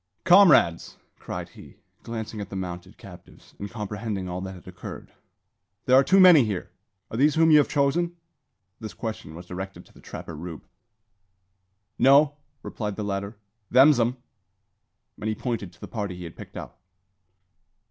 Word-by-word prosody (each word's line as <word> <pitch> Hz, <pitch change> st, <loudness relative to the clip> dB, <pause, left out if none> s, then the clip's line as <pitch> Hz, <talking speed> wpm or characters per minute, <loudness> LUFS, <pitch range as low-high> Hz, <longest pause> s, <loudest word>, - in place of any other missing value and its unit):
"Comrades!" 175 Hz, -, +5 dB, 0.2 s
cried -, -, -6 dB
he, -, -, -15 dB, 0.3 s
glancing 110 Hz, -2 st, -6 dB
at 100 Hz, -, -7 dB
the -, -, -7 dB
mounted 90 Hz, +1 st, -6 dB
captives, 90 Hz, -2 st, -15 dB
and 100 Hz, -, -5 dB
comprehending 105 Hz, -3 st, -5 dB
all 90 Hz, 0 st, -4 dB
that 95 Hz, 0 st, -6 dB
had 90 Hz, -, -15 dB
occurred, 90 Hz, -, -9 dB, 0.7 s
"there 130 Hz, -, +5 dB
are 135 Hz, -, +7 dB
too 190 Hz, +7 st, +4 dB
many 180 Hz, -7 st, +8 dB
here. 105 Hz, -5 st, -4 dB, 0.4 s
Are 110 Hz, -, -4 dB
these 145 Hz, +3 st, +3 dB
whom 160 Hz, 0 st, +4 dB
you 150 Hz, -, +8 dB
have 145 Hz, -, +3 dB
chosen?" 170 Hz, +5 st, 0 dB, 0.6 s
This 110 Hz, -2 st, -8 dB
question 110 Hz, -8 st, -6 dB
was 90 Hz, +2 st, -10 dB
directed 95 Hz, +2 st, -7 dB
to -, -, -23 dB
the -, -, -18 dB
trapper 85 Hz, -, -8 dB
Rube. 80 Hz, 0 st, -8 dB, 1.3 s
"No," 140 Hz, +2 st, +5 dB, 0.3 s
replied 105 Hz, -3 st, -5 dB
the 105 Hz, -, -4 dB
latter, 100 Hz, +1 st, -4 dB, 0.3 s
"them's 135 Hz, +2 st, +6 dB
'em," 120 Hz, +2 st, +1 dB, 1.0 s
and 110 Hz, -, -3 dB
he 110 Hz, -, -1 dB
pointed 115 Hz, -8 st, -4 dB
to -, -, -23 dB
the -, -, -8 dB
party 100 Hz, -5 st, -4 dB
he 90 Hz, -, -9 dB
had 85 Hz, -, -9 dB
picked -, -, -11 dB
out. -, -, -9 dB
110 Hz, 165 wpm, -25 LUFS, 95-135 Hz, 1.3 s, many